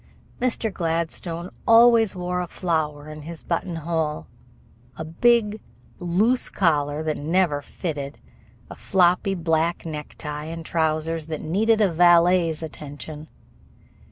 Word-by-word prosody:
Mr. 235 Hz, -4 st, 0 dB
Gladstone 170 Hz, +1 st, -3 dB, 0.2 s
always 230 Hz, -2 st, +6 dB
wore 180 Hz, 0 st, -2 dB
a 180 Hz, -, -4 dB
flower 155 Hz, -5 st, -2 dB
in 155 Hz, 0 st, -8 dB
his 165 Hz, +2 st, -9 dB
button 170 Hz, 0 st, -2 dB
hole, 160 Hz, -, -2 dB, 0.7 s
a 160 Hz, -, -5 dB
big, 215 Hz, +5 st, +2 dB, 0.4 s
loose 200 Hz, +9 st, +1 dB
collar 150 Hz, -4 st, +1 dB
that 155 Hz, -1 st, -1 dB
never 160 Hz, -1 st, +1 dB
fitted, 145 Hz, -2 st, -5 dB, 0.5 s
a -, -, -9 dB
floppy 185 Hz, 0 st, +2 dB
black 165 Hz, -1 st, 0 dB
necktie, 150 Hz, -1 st, -6 dB
and 165 Hz, 0 st, -7 dB
trousers 160 Hz, -1 st, -1 dB
that 155 Hz, -2 st, -4 dB
needed 215 Hz, +7 st, +2 dB
a 195 Hz, -5 st, +3 dB
valet's 170 Hz, -1 st, +4 dB
attention. 150 Hz, 0 st, -8 dB
165 Hz, 120 wpm, -24 LUFS, 155-180 Hz, 0.7 s, always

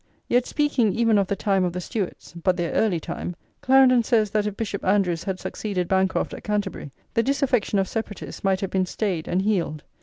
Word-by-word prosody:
Yet 245 Hz, +1 st, +2 dB
speaking 275 Hz, -9 st, +1 dB
even 225 Hz, -2 st, +3 dB
of 195 Hz, -, +1 dB
the 200 Hz, -, -1 dB
time 195 Hz, -2 st, +1 dB
of 175 Hz, -1 st, -1 dB
the 180 Hz, -, -3 dB
Stuarts, 195 Hz, 0 st, -5 dB
but 175 Hz, +1 st, 0 dB
their 170 Hz, -2 st, -1 dB
early 195 Hz, -7 st, +2 dB
time, 175 Hz, +2 st, -5 dB, 0.3 s
Clarendon 260 Hz, -1 st, +6 dB
says 220 Hz, -3 st, +2 dB
that 210 Hz, -1 st, +1 dB
if 205 Hz, -1 st, -5 dB
Bishop 205 Hz, -3 st, -3 dB
Andrewes 185 Hz, -4 st, +1 dB
had 190 Hz, -1 st, -2 dB
succeeded 190 Hz, -5 st, -3 dB
Bancroft 190 Hz, 0 st, +1 dB
at -, -, -8 dB
Canterbury, 205 Hz, -8 st, -3 dB, 0.2 s
the 230 Hz, -, +3 dB
disaffection 260 Hz, -5 st, +1 dB
of 195 Hz, -1 st, +1 dB
separatists 220 Hz, -1 st, -5 dB
might 190 Hz, -1 st, +1 dB
have 195 Hz, -, -3 dB
been 185 Hz, -1 st, +1 dB
stayed 180 Hz, -5 st, -2 dB
and 185 Hz, +2 st, 0 dB
healed. 175 Hz, -7 st, -1 dB
200 Hz, 205 wpm, -24 LUFS, 185-225 Hz, 0.3 s, Clarendon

